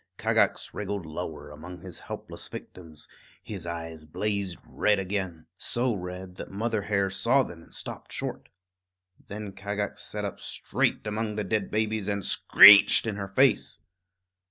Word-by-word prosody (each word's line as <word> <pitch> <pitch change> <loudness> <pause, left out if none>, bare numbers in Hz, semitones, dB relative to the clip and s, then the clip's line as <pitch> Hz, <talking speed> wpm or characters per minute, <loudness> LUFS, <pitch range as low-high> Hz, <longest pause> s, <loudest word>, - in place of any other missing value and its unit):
Kagax - - +1
wriggled 100 -4 -4
lower 80 -2 -6
among 85 +4 -10
his 90 -2 -8
helpless - - -6
victims; 80 -4 -10 0.4
his 95 -5 -7
eyes 80 -2 -6
blazed 100 +1 -2
red 105 -1 +1
again, 95 -4 -3
so 120 0 0
red 90 -1 -7
that - - -7
Mother 110 +2 -1
Hare 100 -1 0
saw 125 +7 +3
them 85 -7 -9
and - - -12
stopped - - -7
short. - - -5 0.8
Then 105 0 -6
Kagax 100 +1 -4
sat - - -3
up - - -5
straight - - -1
among 105 0 -2
the 105 - -1
dead 105 0 -1
babies 110 -1 -1
and 100 -2 -1
screeched 105 +2 +8
in 110 -2 -2
her 100 -1 -4
face. 120 +4 +2
100 Hz, 150 wpm, -27 LUFS, 90-105 Hz, 0.8 s, screeched